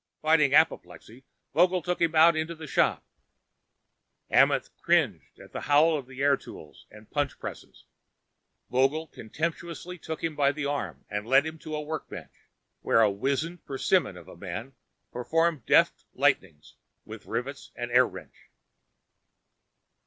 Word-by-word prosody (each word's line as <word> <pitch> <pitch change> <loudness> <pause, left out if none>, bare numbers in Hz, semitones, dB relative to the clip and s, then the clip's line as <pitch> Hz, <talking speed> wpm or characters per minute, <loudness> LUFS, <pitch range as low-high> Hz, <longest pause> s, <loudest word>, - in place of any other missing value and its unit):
Fighting 155 -3 +4
apoplexy, 130 - 0 0.3
Vogel 180 +1 +3
took 180 +1 -2
him 165 -1 +2
out 165 +1 +7
into 160 +2 -2
the 160 0 -9
shop. 150 - +1 1.3
Amenth - - +3
cringed - - 0
at - - -14
the - - -4
howl 150 +3 +4
of 135 -4 -5
air 140 +2 +2
tools - - -13
and 105 0 -16
punch 145 -2 -1
presses. - - -9 0.9
Vogel 135 +5 +2
contemptuously 170 +7 -5
took 160 0 -6
him 165 -2 -2
by 140 -1 +3
the 150 -1 -4
arm 100 - -4
and 105 +2 -4
led 135 +3 +5
him 160 0 -6
to 155 0 -6
a 150 - -3
workbench 155 +1 -7 0.5
where 115 - +3
a 105 -2 +4
wizened 140 - -2
persimmon 135 - 0
of 85 - -13
a - - -12
man 100 +9 -7 0.4
performed 160 +2 0
deft - - +3
lightnings 75 -2 0 0.3
with 110 -1 -11
rivets 130 +5 -4
and 120 0 -5
air 125 0 +5
wrench. - - -13
145 Hz, 145 wpm, -27 LUFS, 120-160 Hz, 1.3 s, out